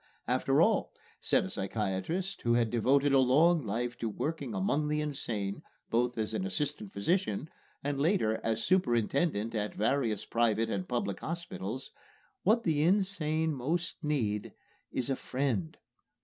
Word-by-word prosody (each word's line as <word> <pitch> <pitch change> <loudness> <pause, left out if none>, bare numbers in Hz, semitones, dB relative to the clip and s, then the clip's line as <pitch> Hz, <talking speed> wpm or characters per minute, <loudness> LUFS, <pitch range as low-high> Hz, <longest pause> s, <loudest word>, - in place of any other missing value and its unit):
"After - - +3
all," - - +1 0.3
said - - +2
a 95 - -6
psychiatrist 105 - -2
who 120 0 +2
had 115 -2 +2
devoted 135 +4 +3
a 135 - +6
long 150 +6 +4
life 120 +3 -3
to 115 - -1
work 155 +9 -3
among 125 +5 0
the 150 0 0
insane, 115 -9 -2 0.3
both 120 +1 +1
as 110 0 -1
an 110 - -1
assistant 105 +1 -3
physician 140 - 0 0.3
and 140 0 -1
later 145 - +2
as 115 0 0
superintendent 120 - +1
at 105 -2 -2
various 115 -2 0
private 115 -1 +1
and 185 - -2
public 205 - -1
hospitals, 135 - -5 0.5
"what 225 +4 +3
the 155 -3 +2
insane 160 -4 +2
most 160 +6 -1
need 115 -9 -1 0.4
is 130 +1 -1
a - - +2
friend!" 125 - -2
130 Hz, 145 wpm, -31 LUFS, 110-155 Hz, 0.5 s, a